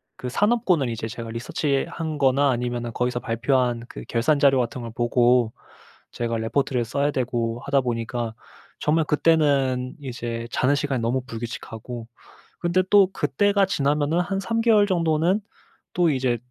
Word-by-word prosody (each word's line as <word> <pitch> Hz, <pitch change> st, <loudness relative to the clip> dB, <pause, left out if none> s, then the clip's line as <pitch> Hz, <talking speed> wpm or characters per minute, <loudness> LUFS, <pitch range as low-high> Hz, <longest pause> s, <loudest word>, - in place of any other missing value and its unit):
그 125 Hz, -, -6 dB
산업군을 190 Hz, -, +2 dB
이제 110 Hz, -1 st, -4 dB
제가 115 Hz, +1 st, -7 dB
리서치한 145 Hz, +6 st, -2 dB
거나 140 Hz, 0 st, +3 dB
아니면은 120 Hz, -1 st, -2 dB
거기서 125 Hz, +1 st, -1 dB
발표한 120 Hz, +1 st, 0 dB
그 -, -, -8 dB
결산 130 Hz, +6 st, +2 dB
자료 135 Hz, -2 st, +4 dB
같은 120 Hz, +1 st, -2 dB
걸 115 Hz, -, -6 dB
보고 120 Hz, -1 st, +3 dB, 0.6 s
제가 115 Hz, -1 st, -2 dB
레포트를 120 Hz, +2 st, 0 dB
써야 140 Hz, +5 st, 0 dB
되고 120 Hz, -3 st, -2 dB
하다 140 Hz, -1 st, +2 dB
보니까 120 Hz, -2 st, -3 dB, 0.4 s
정말 160 Hz, +2 st, +2 dB
그때는 140 Hz, -5 st, +2 dB
이제 120 Hz, -4 st, -5 dB
자는 135 Hz, +3 st, +2 dB
시간이 140 Hz, -3 st, -1 dB
너무 120 Hz, +3 st, 0 dB
불규칙하고 115 Hz, 0 st, -7 dB, 0.6 s
근데 175 Hz, +2 st, +2 dB
또 200 Hz, -2 st, +6 dB
그때가 195 Hz, +6 st, +2 dB
지나면은 150 Hz, -2 st, +1 dB
한 195 Hz, +2 st, -2 dB
3 230 Hz, +3 st, -1 dB
개월 215 Hz, -3 st, +4 dB
정도는 170 Hz, +1 st, +1 dB, 0.5 s
또 175 Hz, -2 st, +3 dB
이제 130 Hz, -3 st, +1 dB
130 Hz, 320 characters per minute, -24 LUFS, 120-155 Hz, 0.6 s, 또